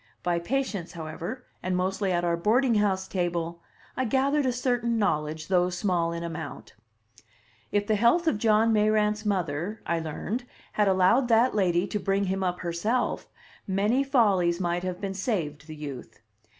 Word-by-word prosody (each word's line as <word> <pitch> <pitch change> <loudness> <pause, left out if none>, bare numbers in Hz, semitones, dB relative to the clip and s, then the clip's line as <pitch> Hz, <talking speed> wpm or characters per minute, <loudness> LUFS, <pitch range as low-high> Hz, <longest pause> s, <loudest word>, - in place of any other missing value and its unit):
By 175 -1 +1
patience, 205 -4 -2
however, 170 +9 -6 0.2
and 185 0 -1
mostly 190 +1 0
at 175 -1 +1
our 170 -1 +2
boarding 230 +8 +2
house 195 -3 +1
table, 170 -2 -2 0.3
I 260 - 0
gathered 270 +3 +1
a - - +2
certain 245 -2 0
knowledge, 155 -6 -1
though 180 -1 +3
small 180 -2 0
in 170 0 -4
amount. 160 -4 -7 1.0
If 205 0 +1
the 215 - +1
health 235 +11 +3
of 275 -10 +1
John 225 +1 +3
Mayrant's 210 0 +2
mother, 190 +1 -1
I 170 0 0
learned, 185 - -4 0.3
had 210 -1 +2
allowed 190 +7 +4
that 235 +2 +4
lady 180 -3 +2
to 210 - -3
bring 195 +1 0
him 190 0 -1
up 180 -1 -1
Herself, 180 +8 -1 0.4
many 205 +7 +2
follies 195 -10 +2
might 175 -1 0
have 185 -1 -4
been 195 -1 -3
saved 165 - -3
the 155 - -8
youth. 140 -6 -8
195 Hz, 165 wpm, -27 LUFS, 170-220 Hz, 1.0 s, allowed